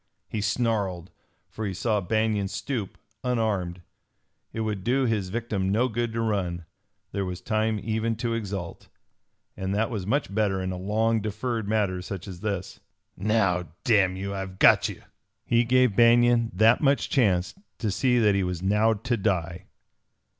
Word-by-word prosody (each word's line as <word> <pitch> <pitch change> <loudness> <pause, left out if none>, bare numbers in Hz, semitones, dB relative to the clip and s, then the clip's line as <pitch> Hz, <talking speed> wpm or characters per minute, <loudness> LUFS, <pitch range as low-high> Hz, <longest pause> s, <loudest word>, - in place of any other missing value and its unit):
He 105 - -3
snarled, 100 -5 -1 0.4
for 110 - -7
he 95 - -4
saw 105 +1 0
Banion 110 +1 0
stoop, 105 +2 -4 0.3
unarmed. 105 -8 -1 0.7
It 110 - -4
would 105 -4 -3
do 130 +5 +2
his 105 -6 0
victim 105 -3 -2
no 115 +5 +2
good 120 0 -2
to 115 - -1
run. 90 -6 -1 0.5
There 100 - -2
was 90 -1 -4
time 110 +2 0
even 110 +1 -1
to 115 +1 -2
exult, 100 -6 -5 0.7
and 95 +1 -3
that 110 +3 0
was 100 -5 -4
much 140 -3 0
better 100 -3 +1
in 95 0 -2
a - - -4
long 110 +4 0
deferred 110 +1 -3
matter 100 -4 0
such 95 +1 -7
as 90 -3 -8
this. 100 -2 -4 0.4
"Now, 95 -4 +1 0.2
damn 100 -6 +3
you, 100 +1 -4
I've 95 -1 -5
got - - +5
you!" - - -9 0.4
He 120 0 +3
gave 125 -2 +3
Banion 120 0 +5
that 110 +4 +5
much 140 -2 +2
chance 95 -8 +2 0.2
to 110 -3 -1
see 125 +4 +2
that 105 -3 +4
he 100 - +1
was 90 -1 -3
now 105 +3 +3
to 120 +4 -2
die. 90 -3 -2
105 Hz, 165 wpm, -26 LUFS, 95-115 Hz, 0.7 s, got